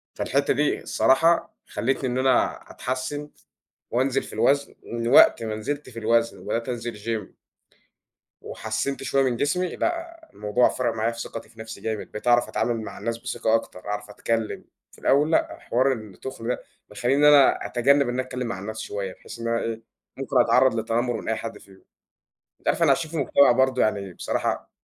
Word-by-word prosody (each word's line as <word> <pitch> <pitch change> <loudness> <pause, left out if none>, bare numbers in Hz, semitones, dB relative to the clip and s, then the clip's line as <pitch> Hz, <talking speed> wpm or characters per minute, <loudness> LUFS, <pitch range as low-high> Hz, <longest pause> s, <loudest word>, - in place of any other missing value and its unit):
فالحِتّة 140 +1 +1
دي 145 +2 0
الصراحة 165 +6 +3
خلِّتني 130 +1 -1
إن 125 - -2
أنا 130 -1 +2
أتحسّن 130 +4 -4 0.6
وأنزِل 130 +2 +1
في - - -11
الوزن، 140 0 +1
من 115 0 -4
وقت 120 -2 +6
ما 110 -1 -3
نزِلت 145 +6 -4
في 115 -2 -8
الوزن 115 +1 +1
وبدأت 115 +2 -3
أنزِل 120 -2 -4
gym 110 -2 -4 1.0
وحسّنت 110 +6 -3
شوية 135 0 +2
من 130 -3 +1
جسمي 180 +8 -1
لأ، 335 -1 -3
الموضوع 105 +4 +2
فرَق 120 -3 -1
معايا 110 +1 0
في 115 - -8
ثقتي 115 - -7
في 110 - -16
نَفْسي 110 0 -8
جامد، 110 -2 -4
بقيت 105 - -7
أعرَف 120 0 +4
أتعامل 120 -2 -1
مع 110 - -8
الناس 115 +2 -3
بثقة 115 -1 -1
أكتر، 115 -5 -2
أعرف 105 0 -4
أتكلّم، 115 +1 -2 0.3
في - - -18
الأول 145 +4 +3
لأ، - - +1
حوار 130 +3 +1
التُّخن 115 +1 -7
ده 125 - -1 0.3
مخلّيني 120 +6 0
إن - - +4
أنا 140 -2 +5
أتجنّب 140 +2 +3
إن 120 - -2
أنا 130 - 0
أتكلّم 130 -1 -5
مع 115 -5 -4
الناس 110 +3 -6
شوية 100 -3 -4
بحيث 115 - -11
إن 115 - -3
أنا 115 0 +1
إيه، 115 0 -4 0.3
ممكن - - +1
أتعرّض 130 -1 +4
للتتنمّر 115 +2 -1
من - - -8
أي 115 - +2
حَد 115 - -6
فيهم، 95 -1 -19 0.8
أنت - - -12
عارف - - +3
إحنا 160 -4 +5
عايشين 155 +3 0
في 165 - -4
مجتمَع 140 -1 +5
برضه 130 +1 +2
يعني 100 -3 0
بصراحة - - -2
120 Hz, 185 wpm, -24 LUFS, 110-135 Hz, 1.0 s, وقت